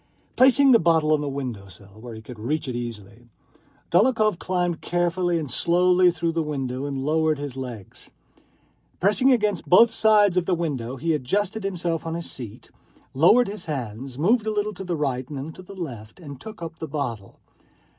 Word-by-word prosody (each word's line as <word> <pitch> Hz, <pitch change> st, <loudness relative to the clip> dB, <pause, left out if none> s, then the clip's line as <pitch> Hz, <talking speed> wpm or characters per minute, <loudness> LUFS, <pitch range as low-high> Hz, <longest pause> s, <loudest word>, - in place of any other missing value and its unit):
Placing 270 Hz, +1 st, +6 dB
the 230 Hz, -, +7 dB
bottle 160 Hz, -2 st, +3 dB
on 150 Hz, -, +1 dB
the 145 Hz, -, -3 dB
window 125 Hz, -8 st, -5 dB
sill 100 Hz, +2 st, -14 dB
where 120 Hz, -1 st, -8 dB
he 110 Hz, -, -11 dB
could 120 Hz, 0 st, -11 dB
reach 150 Hz, +7 st, -2 dB
it 125 Hz, -, -4 dB
easily, 115 Hz, -1 st, -7 dB, 0.6 s
Dólokhov 215 Hz, -1 st, +3 dB
climbed 175 Hz, -2 st, -1 dB
carefully 175 Hz, 0 st, 0 dB
and 160 Hz, -, -2 dB
slowly 180 Hz, +1 st, +4 dB
through 170 Hz, -1 st, -1 dB
the 165 Hz, 0 st, -1 dB
window 135 Hz, -3 st, -3 dB
and 135 Hz, -2 st, -4 dB
lowered 155 Hz, 0 st, +1 dB
his 140 Hz, -2 st, -6 dB
legs. 120 Hz, -7 st, -8 dB, 0.9 s
Pressing 210 Hz, +8 st, +3 dB
against 210 Hz, -6 st, 0 dB
both 230 Hz, +6 st, +7 dB
sides 210 Hz, -4 st, +4 dB
of 180 Hz, -, +1 dB
the 185 Hz, -, +2 dB
window, 135 Hz, -8 st, -3 dB
he 165 Hz, +5 st, -1 dB
adjusted 200 Hz, +9 st, -1 dB
himself 175 Hz, -4 st, -2 dB
on 165 Hz, -, -3 dB
his 170 Hz, -1 st, -4 dB
seat, 120 Hz, -6 st, -9 dB, 0.4 s
lowered 195 Hz, -, +5 dB
his 200 Hz, -2 st, -6 dB
hands, 130 Hz, -3 st, -5 dB
moved 215 Hz, -, +2 dB
a -, -, +1 dB
little 210 Hz, 0 st, -1 dB
to 195 Hz, -, -8 dB
the 180 Hz, -2 st, -2 dB
right 130 Hz, -4 st, -2 dB
and 145 Hz, -, -6 dB
then 145 Hz, +4 st, -6 dB
to -, -, -12 dB
the 190 Hz, +2 st, -12 dB
left, 120 Hz, -, -7 dB
and 140 Hz, -6 st, -10 dB
took 215 Hz, -5 st, -9 dB
up 165 Hz, -1 st, -8 dB
the 160 Hz, -, -5 dB
bottle. 120 Hz, -9 st, -5 dB
160 Hz, 190 wpm, -24 LUFS, 130-185 Hz, 0.9 s, the